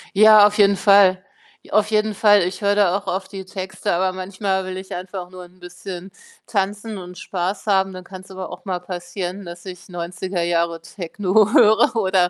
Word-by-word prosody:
Ja, 215 0 +8
auf 210 +1 +1
jeden 200 -1 +5
Fall. 195 -1 +4 0.4
I - - -18
auf 215 0 +2
jeden 215 0 +1
Fall. 205 0 +4
Ich 185 +3 -4
höre 200 0 +2
da 200 -2 +3
auch 200 - -11
auf 190 +1 -3
die 195 -2 -8
Texte, 190 -2 -4
aber 185 +2 +1
manchmal 190 +1 -3
will 185 0 -5
ich 190 0 -8
einfach 180 0 -6
nur 185 -1 -11
'n 180 +1 -21
bisschen 180 +1 -9 0.4
tanzen 205 +1 -2
und 180 -1 -10
Spaß 190 +2 -4
haben. 190 -1 +2
Dann 185 0 -9
kann's 185 0 -12
aber 190 -1 -7
auch - - -11
mal 185 -2 -2
passieren, 180 +1 -6
dass 175 0 -10
ich 180 -2 -10
90er 175 +1 -4
Jahre 170 -1 -1
Techno 195 +4 0
höre 220 +3 +5
oder 190 -4 +2
190 Hz, 195 wpm, -21 LUFS, 180-200 Hz, 0.4 s, Ja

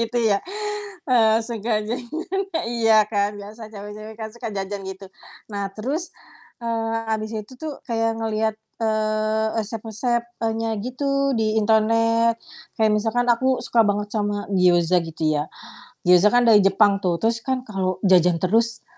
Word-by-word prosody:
gitu 230 +1 -1
ya. 215 -3 +3 0.7
Eee, 225 -4 +4
suka 230 0 -5 0.2
jajan, 235 +4 -4 0.5
e 325 - +1 0.2
iya 220 -2 +5
kan, 205 -1 0
biasa 215 +2 -10
cewek-cewek 210 +1 -9
kan 220 -1 -5
suka 235 -1 -6
jajan 200 0 -4
gitu. 190 +1 -8 0.4
Nah 200 -1 -3
terus, 275 - -4 0.5
eee, 225 -1 -1 0.2
habis 215 0 -2
itu 215 +4 -6
tuh 305 -1 -6
kayak 225 -1 0
ngelihat, 220 -1 -1 0.3
eee, 215 0 0 0.2
resep-resep, 225 +2 -2 0.2
e - - +2
nya 225 0 -1
gitu 275 +3 0
di 215 -1 +1
internet. 230 +2 +3 0.4
Kayak 220 -1 +2
misalkan 225 +3 0
aku 260 +2 +2
suka 230 -3 +3
banget 205 0 -1
sama 205 -1 -2
gioza 180 -2 +4
gitu 165 -1 -8 0.2
ya. 150 - -2 0.6
Gioza 180 +2 +6
kan 245 0 +4
dari 220 -2 +7
Jepang 200 +1 +4
tuh, 180 -3 0
terus 230 +1 +1
kan 260 -1 -1
kalau 190 -4 -2
jajan 180 -3 +5
terus, 225 +6 +1
220 Hz, 150 wpm, -23 LUFS, 205-230 Hz, 0.7 s, dari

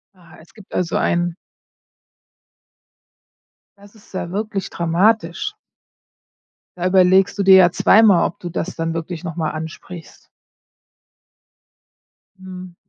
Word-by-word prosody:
Ah. 175 -2 -19
Es 160 - -20
gibt 210 -3 -17
also 175 -2 -2
ein 175 0 0 2.4
Das 200 +2 -19
ist 205 - -21
ja 175 -2 -5
wirklich 205 0 -4
dramatisch. 175 - 0 1.2
Da 180 0 -4
überlegst 185 +1 +3
du - - +2
dir 190 0 +7
ja 180 -2 +6
zweimal, 210 -4 +4
ob - - -12
du 175 - -7
das 175 +1 -5
dann 165 0 -3
wirklich 165 +1 -6
noch 165 -3 -6
mal 160 -3 -2
ansprichst. 160 +2 -10 2.1
Mhm. 185 -1 -11
180 Hz, 115 wpm, -19 LUFS, 170-195 Hz, 2.4 s, dir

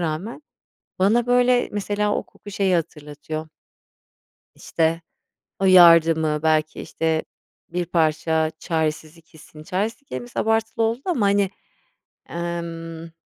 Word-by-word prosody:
rağmen 175 - -4 0.6
bana, 220 +6 +3
böyle, 245 0 +3
mesela 205 0 -1
o - - -1
koku 205 - -14
şeyi 195 -2 +1
hatırlatıyor 155 -1 -5 1.1
işte, 165 0 -1 0.6
o 195 - +1
yardımı, 165 -4 +6
belki, 155 -1 +1
işte, 160 -1 -1 0.5
bir 175 +1 -2
parça 160 -1 +1
çaresizlik 160 0 -3
hissini, 155 -1 -14
çaresizlik 215 - -3
kelimesi 240 0 -6
abartılı 225 +1 0
oldu 230 +3 -2
ama, 330 - 0
hani, 200 -1 +2 0.8
emm 165 -1 -6
170 Hz, 110 wpm, -22 LUFS, 160-205 Hz, 1.1 s, yardımı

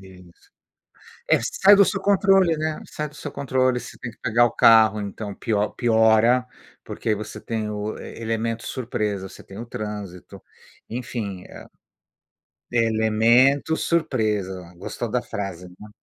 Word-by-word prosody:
E 95 - -14
é - - -14
isso. 85 -2 -21 0.8
É, - - +6
sai 200 +1 +5
do 200 - +7
seu 195 0 -1
controle, 195 -3 +3
né, 155 0 -3
sai 150 0 -4
do 145 - -19
seu 145 - -7
controle, 130 -2 0
você - - -11
tem 120 - -6
que - - -25
pagar 120 +1 +3
o - - -2
carro, 110 -1 +5
então, 100 0 -6
pio 105 -1 -1
piora, 115 +2 +3 0.4
porque 110 - -2
você 105 +1 -7
tem 110 -2 -3
o 105 +1 -4
elemento 115 +1 -4
surpresa, 105 -6 -3
você - - -13
tem 100 - -11
o 120 - -6
trânsito, 105 -6 -7 0.5
enfim, 110 -6 -5
a - - -12 1.0
"Elemento 115 +6 +3
surpresa". 105 - -1
Gostou - - -5
da - - 0
frase, 95 -3 -6
né. 105 - -11
115 Hz, 150 wpm, -23 LUFS, 105-130 Hz, 1.0 s, do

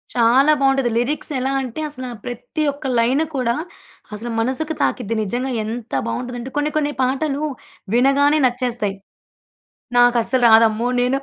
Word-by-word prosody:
చాలా 250 +5 +5
బాగుంటది. 270 -2 +2
లిరిక్స్ 275 +6 -1
ఎలా 265 +1 -1
అంటే, 260 +3 -5
అసల 260 -3 -6 0.2
ప్రతి 245 +5 -4
ఒక్క 285 - -12
లైను 260 +7 +2
కూడా 240 -3 0 0.6
అసలు 225 +3 -6
మనసుకు 265 +7 -1
తాకిద్ది. 230 -3 -1
నిజంగా 245 +6 -2
ఎంత 225 +1 -6
బాగుంటదంటే, 250 +1 -5
కొన్ని 295 +1 0
కొన్ని 295 -1 0
పాటలు 275 +3 -1 0.5
వినగానే 280 +4 +4
నచ్చేస్తాయి. 245 -5 -2 1.0
నాకు 245 0 +5
అస్సలు 255 +1 0
రాదమ్మో! 225 +1 +5
నేను 250 +2 +1
250 Hz, 135 wpm, -20 LUFS, 235-275 Hz, 1.0 s, చాలా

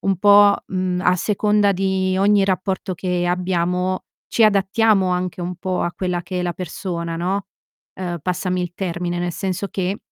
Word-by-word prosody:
un 195 -1 0
po', 205 +1 +6
mhmm, 185 -1 -1
a 180 0 +3
seconda 210 +1 +2
di 190 0 0
ogni 200 0 +4
rapporto 190 0 -1
che 180 0 -1
abbiamo, 180 +1 0 0.2
ci 230 - +2
adattiamo 200 0 +3
anche 180 0 -2
un 175 0 -4
po' 185 0 -2
a 175 - -1
quella 180 -1 -2
che 185 +1 -4
è - - -1
la 175 - -1
persona, 170 -1 -4
no, 190 +4 -2 0.5
ehm, 175 -2 -4
passami 180 +1 -1
il 175 - -4
termine, 175 -1 -3
nel 175 0 -2
senso 190 +2 -3
che 190 +1 -2
185 Hz, 170 wpm, -21 LUFS, 180-195 Hz, 0.5 s, po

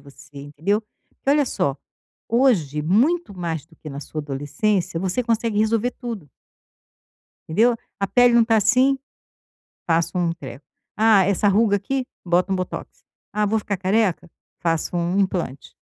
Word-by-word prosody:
você, 140 0 -14
entendeu. 150 +9 -1 0.3
Porque 275 - -3
olha 290 0 +4
só, 140 - -1 0.5
hoje, 200 - +2
muito 245 - +2
mais 165 -4 -3
do 165 - -22
que 155 - -10
na 140 - -6
sua 155 +1 -6
adolescência, 165 +6 -1
você 190 +7 -1
consegue 230 -2 0
resolver 225 +2 +1
tudo 225 - -7 1.2
entendeu. 225 +9 +3 0.2
"A 195 - 0
pele 245 +2 +4
não 235 - +6
está 225 0 +3
assim", 255 +6 +3 0.9
passo 165 0 +1
um 170 -1 +1
treco. 140 -3 -10 0.3
"Ah, 215 -3 +5
essa 200 +2 +2
ruga 205 +1 +3
aqui", 255 +6 -2 0.2
bota 180 +2 +1
um 190 - +1
botox. 185 - -4 0.4
"Ah, 210 0 +1
vou 220 +2 +1
ficar 205 -2 -3
careca", 195 -2 0 0.3
faço 165 0 0
um 175 +3 0
implante. 175 -8 -2
195 Hz, 150 wpm, -22 LUFS, 165-225 Hz, 1.2 s, não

